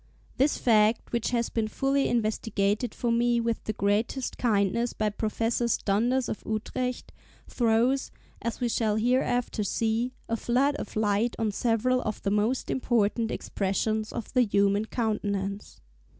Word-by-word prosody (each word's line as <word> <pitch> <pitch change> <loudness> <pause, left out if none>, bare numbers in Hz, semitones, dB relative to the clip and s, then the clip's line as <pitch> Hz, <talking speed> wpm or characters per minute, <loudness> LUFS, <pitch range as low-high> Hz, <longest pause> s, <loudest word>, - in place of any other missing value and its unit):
This 280 +3 +2
fact, 220 -1 +3
which 235 -1 0
has 235 -1 0
been 225 -2 -1
fully 270 +5 +1
investigated 215 -1 0
for 240 - -1
me 235 0 +2
with 230 -1 -1
the 215 - -2
greatest 215 +6 0
kindness 230 +1 +1
by 215 -1 -1
Professors 225 +2 0
Donders 240 +6 +1
of - - -4
Utrecht, 250 +3 -3 0.4
throws, 240 +3 +1 0.3
as 235 - -3
we 245 - 0
shall 220 -2 +1
hereafter 245 0 +1
see, 225 +4 -1
a 230 - 0
flood 260 +5 +1
of - - -7
light 215 +2 +1
on 220 -2 0
several 245 +4 +1
of 215 -3 -3
the 200 - 0
most 215 +5 0
important 230 -2 +1
expressions 215 +2 -1
of 225 - -6
the 255 - +4
human 200 -1 +2
countenance. 205 -3 -3
225 Hz, 145 wpm, -27 LUFS, 210-245 Hz, 0.4 s, the